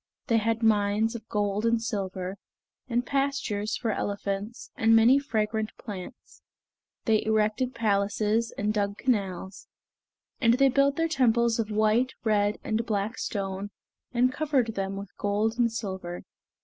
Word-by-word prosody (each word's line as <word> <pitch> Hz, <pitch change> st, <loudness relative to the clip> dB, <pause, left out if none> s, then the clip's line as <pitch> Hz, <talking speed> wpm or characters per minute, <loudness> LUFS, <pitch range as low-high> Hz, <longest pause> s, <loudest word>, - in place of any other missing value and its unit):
They 230 Hz, -5 st, +2 dB
had 225 Hz, +1 st, -1 dB
mines 215 Hz, +1 st, +2 dB
of 225 Hz, -2 st, -8 dB
gold 205 Hz, -1 st, 0 dB
and 230 Hz, 0 st, +3 dB
silver, 195 Hz, -4 st, -4 dB, 0.5 s
and 240 Hz, 0 st, 0 dB
pastures 270 Hz, -6 st, -1 dB
for 230 Hz, -3 st, -1 dB
elephants, 200 Hz, +3 st, -4 dB
and 225 Hz, 0 st, +4 dB
many 235 Hz, +5 st, +6 dB
fragrant 220 Hz, -4 st, -1 dB
plants. 205 Hz, +2 st, -9 dB, 0.6 s
They 220 Hz, -2 st, +3 dB
erected 220 Hz, +3 st, +1 dB
palaces 215 Hz, +1 st, +1 dB
and 210 Hz, +1 st, 0 dB
dug 200 Hz, -1 st, -1 dB
canals; 195 Hz, -6 st, -2 dB, 0.7 s
and 235 Hz, -3 st, +4 dB
they 270 Hz, +1 st, +4 dB
built 275 Hz, +1 st, +3 dB
their 330 Hz, +1 st, +1 dB
temples 235 Hz, -6 st, +2 dB
of 220 Hz, -2 st, -1 dB
white, 215 Hz, +4 st, +2 dB
red, 210 Hz, -1 st, +2 dB
and 220 Hz, +1 st, 0 dB
black 215 Hz, -1 st, -2 dB
stone, 195 Hz, -1 st, -3 dB, 0.4 s
and 250 Hz, +1 st, +2 dB
covered 270 Hz, -7 st, 0 dB
them 195 Hz, -1 st, -3 dB
with 200 Hz, -1 st, -8 dB
gold 215 Hz, +3 st, 0 dB
and 235 Hz, -1 st, +3 dB
silver. 190 Hz, -5 st, -5 dB
220 Hz, 140 wpm, -27 LUFS, 205-235 Hz, 0.7 s, many